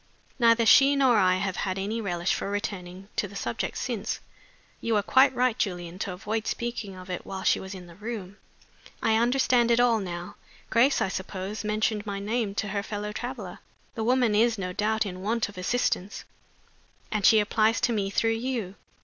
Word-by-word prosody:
Neither 230 -1 +5
she 275 +4 +7
nor 260 -4 +4
I 185 -1 +4
have 190 0 -2
had 190 -1 -2
any 210 +4 -2
relish 175 -3 -1
for - - -3
returning 195 -2 -5
to 205 - +1
the 200 - -13
subject - - -3
since. - - -3 0.6
You 230 -1 0
were 205 - +2
quite 265 +4 +5
right, 250 -2 +2
Julian, 175 -2 -3
to 190 - -3
avoid 215 +4 -3
speaking 230 -5 -3
of 185 0 -11
it 180 - -4
while 190 -1 -6
she - - +3
was 190 +1 -7
in 180 -1 -9
the 170 - -13
room. 205 0 -7 0.7
I 220 - +3
understand 240 0 +3
it 235 0 +4
all 240 -2 +4
now. 175 -2 -6 0.3
Grace, 255 +4 +4
I - - 0
suppose, 190 +2 -5
mentioned 215 0 -1
my 200 -1 -3
name 210 0 -2
to 210 -1 -2
her 200 +1 -1
fellow 210 0 -4
traveler. 220 -4 -6 0.3
The 225 - -3
woman 245 -1 +3
is, 225 +2 +3
no 180 -2 -4
doubt, 215 +2 0
in 185 -2 -6
want 220 +2 0
of 205 - -13
assistance, 190 0 -1 0.9
and 215 -2 -1
she 220 - +7
applies 220 +2 +2
to 240 - +2
me 200 -3 -1
through 215 +3 +1
you. 225 -4 -2
210 Hz, 190 wpm, -27 LUFS, 190-230 Hz, 0.9 s, she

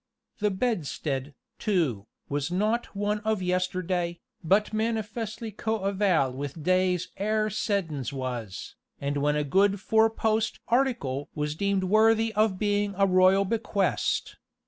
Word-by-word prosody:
The 210 -1 +2
bedstead, 155 - -2 0.2
too, 155 - 0 0.2
was 145 +1 -2
not 215 +5 0
one 205 +1 0
of 215 -2 -1
yesterday, 180 -1 -1 0.2
but 200 +6 +2
manifestly 220 0 -2
coeval 195 - 0
with 145 +3 -6
days 185 0 +2
ere 215 +2 0
Seddons 175 - -1
was, 125 -8 -5 0.3
and 140 +1 -2
when 145 +1 +1
a 150 - +1
good 195 +7 +2
four 220 +2 +3
post 220 0 0
"article" 235 - 0
was 150 -1 -1
deemed 200 +3 0
worthy 220 +3 +3
of 210 -2 +2
being 205 0 0
a 195 - +4
royal 185 +1 +4
bequest. 210 -1 -1
195 Hz, 125 wpm, -27 LUFS, 155-215 Hz, 0.3 s, a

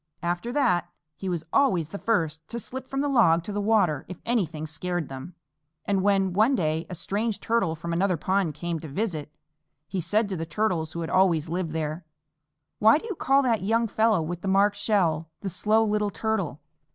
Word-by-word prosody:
After 175 +7 -2
that 180 - +1 0.3
he 190 - -5
was 170 -3 -3
always 185 - +3
the 200 - -6
first 160 -8 0
to 235 - -5
slip 260 +3 -6
from 270 0 -2
the 290 - 0
log 195 -12 +4
to 205 - -6
the 205 0 -2
water 200 -9 +2
if 185 - -8
anything 165 -10 -1
scared 175 +1 -3
them; 135 +6 -8 0.5
and 195 -2 +1
when, 195 -2 +2
one 220 +8 +4
day, 160 -5 -1
a 180 - -5
strange 205 +5 -2
Turtle 210 -8 0
from 170 +1 -5
another 180 +1 +1
pond 185 -2 0
came 170 +1 -3
to 160 - -8
visit, 155 -3 -3 0.6
he 185 -1 -2
said 205 +6 +1
to 190 - -2
the 165 - -3
Turtles 165 -3 -1
who 170 - -4
had 165 - -4
always 170 -5 +3
lived 175 0 -2
there, 155 +1 -3 0.8
"Why 220 +5 +6
do 320 - -8
you 440 - -3
call 275 -4 +3
that 235 -4 +1
young 230 +4 +1
fellow 220 -4 +2
with 175 +2 -5
the - - -4
marked 200 +1 +3
shell 175 -7 +1
'The 195 - -3
Slow 220 +5 +2
Little 210 -1 +1
Turtle?' 200 -8 -2
185 Hz, 200 wpm, -26 LUFS, 165-220 Hz, 0.8 s, Why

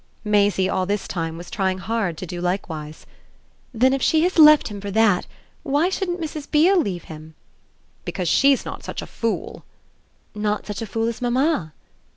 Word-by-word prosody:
Maisie 205 -2 +2
all 185 -1 -1
this 205 0 -2
time 165 -2 -4
was 175 +1 -10
trying 190 -2 0
hard 200 -4 -2
to 185 - -6
do 175 0 -6
likewise. 160 -4 -4 0.7
"Then 260 +2 +3
if 270 - -1
she 315 +4 +3
has 360 -1 +1
left 305 -3 +7
him 205 -1 -7
for 200 - -5
that 205 -3 +2 0.3
why 295 +4 +1
shouldn't 365 -2 -2
Mrs. 305 -3 -6
Beale 345 +5 +4
leave 185 - -4
him?" 155 0 -11 0.7
"Because 180 - -4
she's 275 - +3
not - - -7
such - - -5
a - - -7
fool!" 230 -1 -4 0.7
"Not 210 0 -2
such 210 0 -5
a 225 - -4
fool 225 +2 -1
as 235 +1 -4
mamma?" 245 - 0
210 Hz, 180 wpm, -22 LUFS, 185-275 Hz, 0.7 s, left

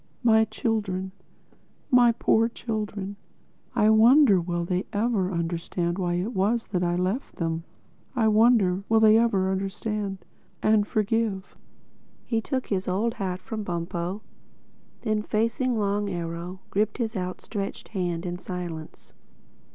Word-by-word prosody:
My 220 -1 +5
children, 205 -4 -2 0.8
my 245 -2 +6
poor 225 0 +2
children!—I 215 0 -3
wonder 225 -2 +6
will 175 0 -2
they 180 +2 -1
ever 205 -3 0
understand 170 +1 -2
why 175 -2 0
it 190 +8 -2
was 220 +4 +1
I 175 -1 +1
left 185 +9 -2
them.... 165 -1 -2 0.5
I 225 -3 +3
wonder 215 -4 +4
will 225 0 +5
they 215 -1 +6
ever 195 -5 +2
understand—and 205 +1 -2
forgive." 215 -2 -1 0.7
He 225 -2 0
took 260 +1 -2
his 190 -2 -2
old 210 +6 0
hat 185 -3 -3
from 220 -1 -4
Bumpo; 175 +2 -3 0.8
then 215 -2 0
facing 230 +3 0
Long 205 0 0
Arrow, 175 +1 -5
gripped 210 +1 0
his 230 -2 -2
outstretched 195 +2 -5
hand 175 -4 -2
in 175 0 -4
silence. 175 -4 -7
200 Hz, 120 wpm, -26 LUFS, 180-220 Hz, 0.8 s, my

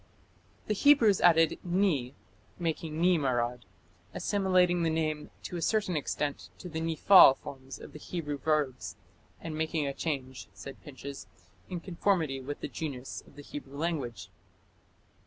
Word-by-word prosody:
The 215 - 0
Hebrews 230 -4 +5
added 165 -2 +5
"ni" 170 -8 +1 0.2
= 105 - -32
"ni 165 +1 +1
marad", 125 -3 0 0.6
assimilating 185 -3 +2
the 165 - +2
name 155 -1 -1
"to 175 - -5
a - - -4
certain 205 -2 +1
extent 145 -1 -2
to 180 - -8
the 160 -2 -4
'niphal 165 -2 +7
forms' 135 -1 -9
of - - -12
the 150 - -9
Hebrew 150 -4 -4
verbs 145 -4 -1 0.4
and 160 -2 -6
making 160 -1 -1
a 140 - -2
change", 135 -4 -4
says 135 - -9
Pinches, 140 0 -8 0.4
"in 180 -2 -4
conformity 170 -6 0
with 145 +2 -6
the - - -3
genius 135 -5 -5
of - - -19
the 145 - -10
Hebrew 140 -1 -8
language". 145 - -3
155 Hz, 145 wpm, -30 LUFS, 135-175 Hz, 0.6 s, niphal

